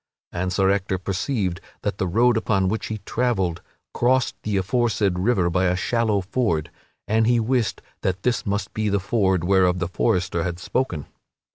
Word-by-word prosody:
And 90 Hz, +1 st, -2 dB
Sir 95 Hz, +1 st, +3 dB
Ector 95 Hz, -1 st, 0 dB
perceived 95 Hz, 0 st, -2 dB, 0.2 s
that 95 Hz, -, -2 dB
the 95 Hz, -, 0 dB
road 120 Hz, +7 st, +3 dB
upon 100 Hz, -4 st, +1 dB
which 110 Hz, +3 st, -2 dB
he 110 Hz, -, -3 dB
travelled 95 Hz, -9 st, 0 dB, 0.3 s
crossed 130 Hz, +1 st, +2 dB
the 105 Hz, -2 st, -1 dB
aforesaid 105 Hz, -2 st, +1 dB
river 95 Hz, -3 st, +2 dB
by 90 Hz, +2 st, +1 dB
a 90 Hz, 0 st, +2 dB
shallow 110 Hz, +1 st, +1 dB
ford, 95 Hz, -6 st, -1 dB, 0.4 s
and 110 Hz, +1 st, +2 dB
he 120 Hz, 0 st, +4 dB
wist 120 Hz, 0 st, 0 dB, 0.2 s
that 95 Hz, 0 st, -2 dB
this 125 Hz, -3 st, +1 dB
must 100 Hz, +1 st, -2 dB
be 110 Hz, -1 st, 0 dB
the 100 Hz, 0 st, +1 dB
ford 95 Hz, -3 st, +1 dB
whereof 90 Hz, -1 st, +3 dB
the 90 Hz, -1 st, -1 dB
forester 90 Hz, -1 st, 0 dB
had 85 Hz, 0 st, -3 dB
spoken. 90 Hz, -, -2 dB
100 Hz, 170 wpm, -23 LUFS, 90-115 Hz, 0.4 s, he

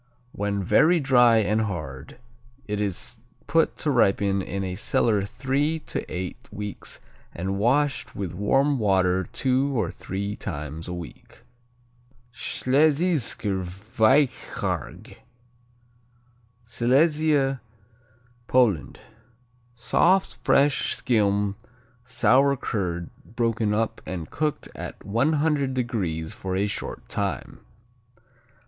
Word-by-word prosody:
When 100 Hz, -1 st, -2 dB
very 170 Hz, -, +4 dB
dry 125 Hz, -5 st, +5 dB
and 110 Hz, 0 st, +2 dB
hard, 75 Hz, -, -5 dB, 0.5 s
it 105 Hz, 0 st, -2 dB
is 110 Hz, +5 st, -3 dB, 0.3 s
put 165 Hz, 0 st, +2 dB
to 150 Hz, -, 0 dB
ripen 100 Hz, -5 st, +2 dB
in 100 Hz, +1 st, -4 dB
a 95 Hz, -1 st, -3 dB
cellar 105 Hz, +1 st, +1 dB
three 135 Hz, +7 st, -1 dB
to -, -, -4 dB
eight 90 Hz, 0 st, -6 dB
weeks 105 Hz, -1 st, -6 dB, 0.4 s
and 95 Hz, +3 st, -2 dB
washed 135 Hz, +5 st, +1 dB
with 95 Hz, -4 st, -4 dB
warm 135 Hz, +9 st, +2 dB
water 95 Hz, -3 st, +2 dB
two 130 Hz, +5 st, 0 dB
or 90 Hz, -5 st, -1 dB
three 100 Hz, +2 st, -4 dB
times 75 Hz, +2 st, -6 dB
a 90 Hz, -, -4 dB
week. 85 Hz, -2 st, -11 dB, 0.9 s
Schlesischer 140 Hz, -, +1 dB
Weichquarg 110 Hz, +8 st, 0 dB, 1.5 s
Silesia, 135 Hz, +3 st, +2 dB, 0.9 s
Poland 115 Hz, -, +2 dB, 0.7 s
Soft, 180 Hz, +10 st, +2 dB
fresh 140 Hz, 0 st, +3 dB
skim, 100 Hz, -4 st, +1 dB, 0.5 s
sour 135 Hz, +2 st, +3 dB
curd, 90 Hz, -8 st, -3 dB, 0.2 s
broken 115 Hz, -2 st, +1 dB
up 110 Hz, +1 st, -1 dB
and 85 Hz, -4 st, -5 dB
cooked 155 Hz, -1 st, -2 dB
at -, -, -7 dB
100° 125 Hz, -, 0 dB
for 95 Hz, -1 st, -4 dB
a 100 Hz, +2 st, +1 dB
short 105 Hz, -, -5 dB
time. -, -, -3 dB
110 Hz, 100 wpm, -25 LUFS, 95-135 Hz, 1.5 s, dry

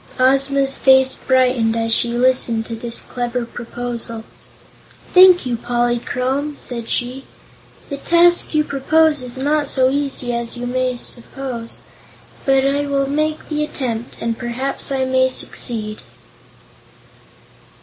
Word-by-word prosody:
Ozma's 270 Hz, +1 st, +2 dB
face 265 Hz, -1 st, +5 dB
brightened 250 Hz, -3 st, +1 dB
as 225 Hz, 0 st, 0 dB
she 235 Hz, -, +1 dB
listened 240 Hz, -2 st, +2 dB
to 230 Hz, -, -6 dB
this 230 Hz, +1 st, -3 dB
clever 245 Hz, 0 st, -4 dB
proposal. 235 Hz, -1 st, -6 dB, 0.9 s
"Thank 365 Hz, -3 st, +7 dB
you, 245 Hz, -2 st, -2 dB
Polychrome," 250 Hz, +4 st, -1 dB
said 235 Hz, -2 st, -7 dB
she. 255 Hz, +2 st, -3 dB, 0.7 s
"The 280 Hz, -, -3 dB
task 345 Hz, +2 st, +4 dB
you 305 Hz, -, +3 dB
propose 300 Hz, +1 st, +2 dB
is 250 Hz, 0 st, -6 dB
not 290 Hz, +2 st, 0 dB
so 260 Hz, -1 st, +3 dB
easy 275 Hz, -3 st, -1 dB
as 235 Hz, 0 st, -4 dB
you 250 Hz, +1 st, -2 dB
suppose, 240 Hz, -1 st, -6 dB, 0.7 s
but 270 Hz, 0 st, +3 dB
I 285 Hz, +1 st, 0 dB
will 275 Hz, -1 st, 0 dB
make 305 Hz, +2 st, -2 dB
the 300 Hz, -1 st, -1 dB
attempt, 240 Hz, -5 st, -4 dB
and 230 Hz, 0 st, -2 dB
perhaps 255 Hz, +4 st, -3 dB
I 265 Hz, -1 st, 0 dB
may 260 Hz, 0 st, +2 dB
succeed." 215 Hz, -4 st, -2 dB
255 Hz, 125 wpm, -19 LUFS, 240-275 Hz, 0.9 s, Thank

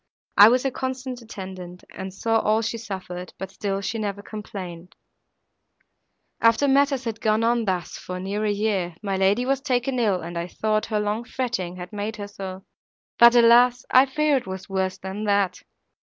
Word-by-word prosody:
I 205 Hz, +2 st, +9 dB
was 250 Hz, +1 st, +2 dB
her 270 Hz, -, 0 dB
constant 260 Hz, -1 st, -4 dB
attendant, 185 Hz, -5 st, -9 dB
and 190 Hz, 0 st, -7 dB
saw 225 Hz, +4 st, +1 dB
all 215 Hz, +1 st, +1 dB
she 230 Hz, +1 st, -3 dB
suffered, 185 Hz, -4 st, -7 dB
but 190 Hz, 0 st, -6 dB
still 195 Hz, 0 st, -3 dB
she 225 Hz, +3 st, -3 dB
never 205 Hz, -1 st, -3 dB
complained. 185 Hz, -5 st, -8 dB, 1.5 s
"After 230 Hz, +5 st, +4 dB
matters 275 Hz, -1 st, +3 dB
had 225 Hz, -2 st, -5 dB
gone 215 Hz, +1 st, +2 dB
on 235 Hz, 0 st, +2 dB
thus, 185 Hz, -3 st, -2 dB
for 180 Hz, 0 st, -6 dB
near 200 Hz, +3 st, -3 dB
a 215 Hz, -, +1 dB
year, 200 Hz, -5 st, -1 dB
my 195 Hz, -2 st, -1 dB
lady 195 Hz, +6 st, +2 dB
was 270 Hz, 0 st, 0 dB
taken 255 Hz, -1 st, 0 dB
ill, 205 Hz, -6 st, +2 dB
and 170 Hz, +1 st, -5 dB
I 170 Hz, -, -3 dB
thought 215 Hz, +3 st, -1 dB
her 215 Hz, -2 st, 0 dB
long 210 Hz, +2 st, -1 dB
fretting 235 Hz, -8 st, -3 dB
had 180 Hz, +2 st, -9 dB
made 210 Hz, +1 st, -3 dB
her 205 Hz, -1 st, -6 dB
so,—but, 195 Hz, +4 st, 0 dB
alas! 240 Hz, +1 st, +6 dB
I 260 Hz, +2 st, +7 dB
fear 300 Hz, +1 st, +2 dB
it 250 Hz, -, -5 dB
was 190 Hz, 0 st, -6 dB
worse 190 Hz, -1 st, -1 dB
than 190 Hz, +3 st, -5 dB
that." 200 Hz, -3 st, +1 dB
210 Hz, 180 wpm, -24 LUFS, 190-235 Hz, 1.5 s, I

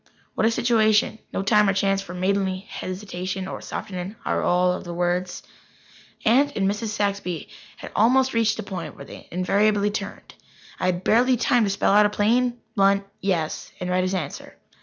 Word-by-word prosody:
What 220 Hz, -, +2 dB
a -, -, +4 dB
situation! 220 Hz, -2 st, +2 dB
No 195 Hz, -, -2 dB
time 210 Hz, 0 st, +4 dB
or -, -, +2 dB
chance 195 Hz, 0 st, +1 dB
for 175 Hz, -3 st, -9 dB
any 180 Hz, -, -6 dB
maidenly 190 Hz, -1 st, 0 dB
hesitation 185 Hz, 0 st, -5 dB
or -, -, -6 dB
softening 185 Hz, +2 st, -6 dB
aureole 180 Hz, +1 st, +2 dB
of 180 Hz, -, -6 dB
words. 175 Hz, +1 st, -2 dB, 0.8 s
Aunt 275 Hz, +6 st, +4 dB
and 195 Hz, -1 st, +1 dB
Mrs. 205 Hz, +3 st, -2 dB
Saxby 200 Hz, -5 st, -2 dB, 0.3 s
had -, -, -9 dB
almost 260 Hz, +4 st, +4 dB
reached 225 Hz, -2 st, +2 dB
the 220 Hz, -, -4 dB
point 170 Hz, -7 st, -6 dB
where 140 Hz, -, -10 dB
they -, -, -12 dB
invariably 205 Hz, +3 st, +2 dB
turned. 200 Hz, -1 st, -6 dB, 0.5 s
I -, -, 0 dB
had 180 Hz, 0 st, -1 dB
barely 250 Hz, +3 st, +4 dB
time 240 Hz, -1 st, +3 dB
to -, -, 0 dB
spell 195 Hz, 0 st, +1 dB
out 210 Hz, 0 st, +6 dB
a -, -, -4 dB
plain, 240 Hz, +4 st, +1 dB, 0.2 s
blunt 200 Hz, -1 st, +3 dB, 0.2 s
"yes" 175 Hz, -5 st, -2 dB
and 180 Hz, 0 st, -3 dB
read 185 Hz, 0 st, +2 dB
his 185 Hz, +1 st, -1 dB
answer. 160 Hz, -7 st, -6 dB
200 Hz, 180 wpm, -24 LUFS, 185-215 Hz, 0.8 s, out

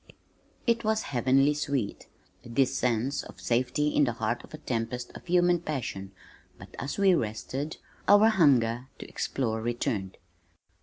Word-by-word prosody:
It 235 Hz, -1 st, +2 dB
was 220 Hz, 0 st, +1 dB
heavenly 135 Hz, +4 st, +3 dB
sweet, 140 Hz, -7 st, -3 dB, 0.4 s
this 130 Hz, +2 st, +1 dB
sense 125 Hz, +3 st, 0 dB
of -, -, -13 dB
safety 125 Hz, +5 st, +1 dB
in 145 Hz, -, +3 dB
the 120 Hz, -, -1 dB
heart 115 Hz, +2 st, -2 dB
of -, -, -15 dB
a 155 Hz, -, -7 dB
tempest 120 Hz, -2 st, -3 dB
of -, -, -11 dB
human 175 Hz, 0 st, +3 dB
passion 125 Hz, -, -4 dB, 0.5 s
but -, -, -13 dB
as 135 Hz, -, -4 dB
we 195 Hz, -2 st, +5 dB
rested, 135 Hz, +4 st, -3 dB, 0.3 s
our 205 Hz, +2 st, +7 dB
hunger 130 Hz, -, +3 dB
to -, -, -9 dB
explore 110 Hz, -4 st, -2 dB
returned. 110 Hz, -5 st, -2 dB
130 Hz, 145 wpm, -28 LUFS, 115-155 Hz, 0.5 s, our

